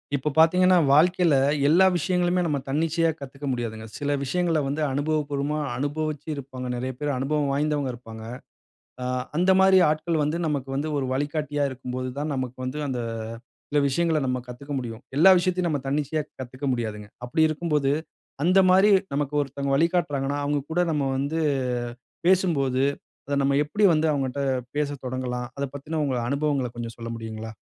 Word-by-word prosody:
இப்ப 145 +2 -1
பார்த்தீங்கனா, 180 +3 +5 0.2
வாழ்க்கையில 170 +1 +4 0.3
எல்லா 175 +6 +6
விஷயங்களுமே 180 +2 +1
நம்ம 150 -4 0
தன்னிச்சையா 165 +3 +1
கத்துக்க 140 +1 -8
முடியாதுங்க. 115 -3 -4
சில 145 0 0
விஷயங்கள 165 +3 +1
வந்து 140 +3 -2
அனுபவ 145 +3 0
பூர்வமா 145 +2 -1 0.2
அனுபவிச்சு 150 +2 -3
இருப்பாங்க 130 -2 -7
நெறைய 125 +2 -3
பேர், 145 -1 -1
அனுபவம் 145 +2 0
வாய்ந்தவங்க 145 -1 0
இருப்பாங்க. 115 -2 -10 0.8
ஆ - - -3 0.3
அந்த 180 +2 +4
மாரி 190 0 +6
ஆட்கள் 155 +2 0
வந்து 150 +3 0
நமக்கு 140 -3 -2
வந்து 145 +3 -1
ஒரு 135 - -1
வழிகாட்டியா 145 +1 -1
இருக்கு 130 -1 -10
போது 130 0 -3
தான், 150 +1 -2
நமக்கு 130 -1 -4
வந்து 130 +4 -4
அந்த 125 -3 -2 0.7
சில 145 - +2
விஷயங்கள 160 +3 +1
நம்ம 125 0 0
கத்துக்க 140 +4 -7
முடியும். 115 -2 -6 0.2
எல்லா 185 +6 +8
விஷயத்தையும் 180 0 0
நம்ம 145 -3 -1
தன்னிச்சையா 150 +2 0 0.2
கத்துக்க 130 +2 -7
முடியாதுங்க. 110 -3 -4 0.2
அப்படி 125 +6 0
இருக்கும் 155 +1 -3
போது, 140 -2 +2 0.5
அந்த 185 +3 +5
மாரி 190 +3 +6 0.2
நமக்கு 145 0 -1
ஒருத்தங்க 140 0 -3
வழிகாட்றாங்கன்னா, 145 -4 +1
அவங்க 145 0 0
கூட 175 - 0
நம்ம 150 -2 0
வந்து 140 +4 -1 0.9
பேசும்போது 145 -9 +2 0.4
அத 145 - 0
நம்ம 140 0 +2
எப்படி 205 +8 -2
வந்து 155 0 +2
அவங்கட்ட 135 0 -2 0.3
பேச 150 -1 0
தொடங்கலாம்? 125 -1 -3
அத 140 - -2
பத்தின 150 +3 -5
உங்க 135 -2 -1
அனுபவங்கள 140 -2 0
கொஞ்ச 120 -1 -4
சொல்ல 115 0 -6
முடியுங்களா? 110 -1 -6
145 Hz, 160 wpm, -25 LUFS, 130-160 Hz, 0.9 s, எல்லா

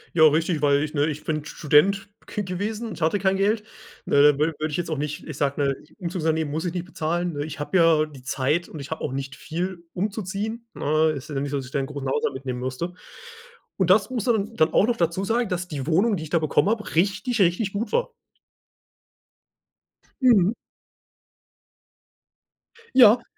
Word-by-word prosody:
Ja 160 -2 +7
richtig, 160 +1 +1
weil 145 -1 +3
ich, 150 - -4
ne, 145 0 +2
ich 155 0 -4
bin 155 -2 -2
Student 155 +7 +2 0.2
ge 210 - -3
gewesen 210 +5 -3
und 195 - -8
hatte 160 +6 +2
kein 190 0 +1
Geld. 210 +3 +1 0.4
Ne, 140 - +4
da 150 +1 +7
wü 155 +2 +1
würde 155 - -1
ich 150 - -3
jetzt 175 -2 -3
auch 155 - -1
nicht, 150 0 -4
ich 155 -3 -7
sage, 140 0 0
ne, 140 -1 +2 0.2
Umzugsunternehmen 160 -4 -1
muss 160 +4 -2
ich 175 - -2
nicht 180 -1 -3
bezahlen, 175 0 -2
ne? 145 -1 -3
Ich 155 -1 -8
habe 145 +6 0
ja 165 -3 +5
die 145 -4 -13
Zeit 135 +6 -1
und 155 - -8
ich 140 +1 -8
habe 160 - -4
auch - - -2
nicht 135 0 -5
viel 175 +1 -4
umzuziehen, 210 +4 -3
ne? 155 +2 +2
Ist 140 +4 -9
ja 135 - -2
nicht 140 +1 -2
so, 140 - -1
dass 135 - -4
ich 130 - -12
da 140 - 0
'nen 135 - -2
großen 140 -2 -5
Haushalt 130 - 0
mitnehmen 130 -2 -4
musste. 130 +8 -4 0.8
Und 190 -2 +1
das 200 +3 +5
musst 240 -4 -2
du 240 - +5
dann 215 +1 -2
dann 155 - +3
auch - - +5
noch 240 - 0
dazu 170 +3 0
sagen, 230 +1 0
dass 180 0 -2
die 145 -3 -5
Wohnung, 200 +7 +3
die - - -6
ich 155 - -8
da 170 - +4
bekommen 155 +5 +2
hab, 220 -1 -2
richtig, 205 +6 +1
richtig 190 +3 +2
gut 215 +4 -3
war. 485 +1 0 2.1
Mhm. 220 -6 +5 2.4
Ja. 235 -1 +7
170 Hz, 205 wpm, -24 LUFS, 150-200 Hz, 2.4 s, Ja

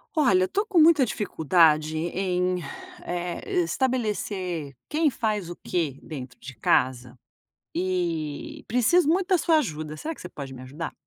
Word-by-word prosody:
Olha, 200 -12 +4
eu - - -1
tô 410 +2 0
com 400 -5 -1
muita 310 -4 +7
dificuldade 160 -6 +2
em, 180 +2 0 0.5
eh 175 0 -2
estabelecer 190 - -2
quem 310 0 +2
faz 215 -8 -2
o 175 - -6
quê 155 -7 -1
dentro 130 -5 -8
de 130 +1 -10
casa, 125 +2 +1 0.6
e 170 -5 -2
preciso 265 +8 +3
muito 360 +3 +2
da 375 -2 +4
sua 330 -1 +3
ajuda, 155 - -3
será 320 - -4
que - - -15
você 180 - -7
pode 140 -5 -8
me 130 - -9
ajudar? 145 +6 -6
180 Hz, 150 wpm, -26 LUFS, 155-245 Hz, 0.6 s, muita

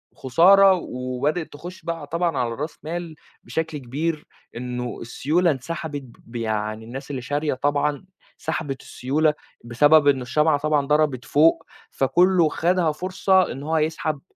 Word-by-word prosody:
خُسارة 190 +9 +6
وبدأت 140 +1 -3
تخش 175 +5 -9
بقى 165 -3 -4
طبعًا 170 -2 -1
على 120 -2 0
راس 150 +5 -5
مال 165 0 -5 0.3
بشكل 160 -1 -3
كبير، 150 +5 -3 0.3
إنه 125 0 -4
السيولة 155 +9 +1
انسحبت 145 +1 -5 0.2
ب 115 - -15
يعني 110 -1 -2
الناس 135 +5 -8
اللي 130 -3 -4
شارية 145 +4 -1
طبعًا 145 +4 -1 0.3
سحبت 140 -5 -4
السيولة 150 +4 0 0.3
بسبب 145 +6 +4
إنه 135 -2 +4
الشمعة 150 +5 +2
طبعًا 150 -2 +1
ضربت 150 -4 +1
فوق، 155 +3 +3 0.3
فكُلّه 175 +4 +3
خدها 170 0 +1
فرصة 185 +3 +1
إن 135 - -7
هو 160 +2 0
يسحب 155 -1 -1
150 Hz, 140 wpm, -23 LUFS, 130-165 Hz, 0.3 s, خُسارة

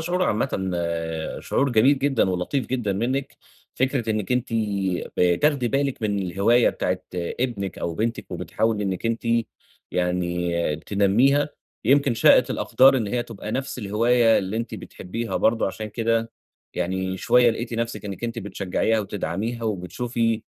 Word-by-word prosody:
شعور 175 +3 -1
عامةً 110 +1 +1 0.9
شعور 140 0 0
جميل 130 +5 +5
جدًا 135 -8 +2
ولطيف 95 +8 -1
جدًا 120 -6 -1
منِك، 130 +7 -2 0.4
فكرة 130 -3 0
إنِك 105 0 -1
أنتِ 125 0 0 0.7
بتاخدي 120 - +2
بالِك 135 -2 -1
من 100 -2 0
الهواية 100 +6 +3
بتاعة 90 0 -1 0.2
ابنِك 100 +2 -3
أو 85 - -3
بنتِك 115 +5 -2
وبتحاولي 110 -2 -1
إنِك 95 +3 -2
أنتِ 115 0 -1 0.7
يعني 90 -2 0
تنميها، 105 - +2 0.4
يمكِن 135 0 +4
شائت 110 - +5
الأقدار 135 +1 +4
إن 110 -4 -1
هي 120 +3 -1
تبقى 110 -2 -7
نفس 135 0 -3
الهواية 115 +2 +3
اللي 95 +3 -3
أنتِ 115 - -3
بتحبيها 115 +5 -5
برضه 115 0 +2
عشان 105 +3 -4
كده 115 +1 0 0.4
يعني 95 +1 -2
شوية 120 +6 +4
لقيتِ 115 +1 -4
نفسِك 115 -1 -3
إنِك 100 +3 -5
أنتِ 115 0 -3
بتشجعيها 100 +2 -1
وتدعميها 105 +3 -3
وبتشوفي 110 +4 -1
115 Hz, 135 wpm, -24 LUFS, 95-125 Hz, 0.9 s, جميل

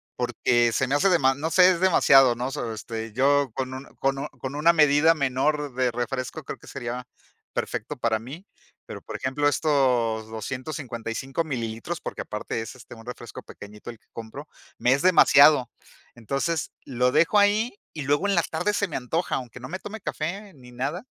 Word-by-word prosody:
porque 120 -1 +1
se 130 +3 0
me 135 - -1
hace, 170 +7 +3
dema 135 -7 +4
no 155 +4 -3
sé, 180 +3 +7
es 170 - -1
demasiado, 135 -9 +5
¿no? 125 +3 -3
So 120 -6 -4
este, 110 0 -6
yo 140 +2 +2
con 130 +1 -4
un 130 +1 -7
con 135 0 0
un 140 - -3
con 135 -1 -8
una 160 +3 +5
medida 150 +1 +5
menor 140 0 0
de 130 0 +1
refresco 125 +2 -4
creo - - -7
que - - -17
sería 120 +1 -5 0.5
perfecto 135 +7 -4
para 115 -2 0
mí. 140 - -10 0.4
Pero, - - -8
por - - -8
ejemplo, 140 +3 0
estos 125 -7 +1
255 130 - -4
mililitros, 120 +3 -4
porque - - -5
aparte 105 +1 -4
es, 115 - -8
este, 120 -1 -13
un 115 0 -14
refresco 120 -2 -8
pequeñito 105 +2 -11
el 115 -2 -9
que - - -38
compro, 115 +7 -9 0.3
me 125 - +3
es 140 - 0
demasiado. 145 -7 +6 0.5
Entonces, 140 +7 -2
lo 125 0 +1
dejo 165 +7 +4
ahí 205 +2 +2
y 155 - -6
luego 145 +8 +1
en 200 - +2
la 170 - +4
tarde 205 +6 -1
se 200 -1 0
me - - -3
antoja, 160 +8 -2
aunque 125 -1 -6
no 125 - -8
me 185 +3 -5
tome 220 +1 -8
café 190 +7 -4
ni 125 -2 -15
nada. 140 - -3
135 Hz, 190 wpm, -25 LUFS, 120-155 Hz, 0.5 s, sé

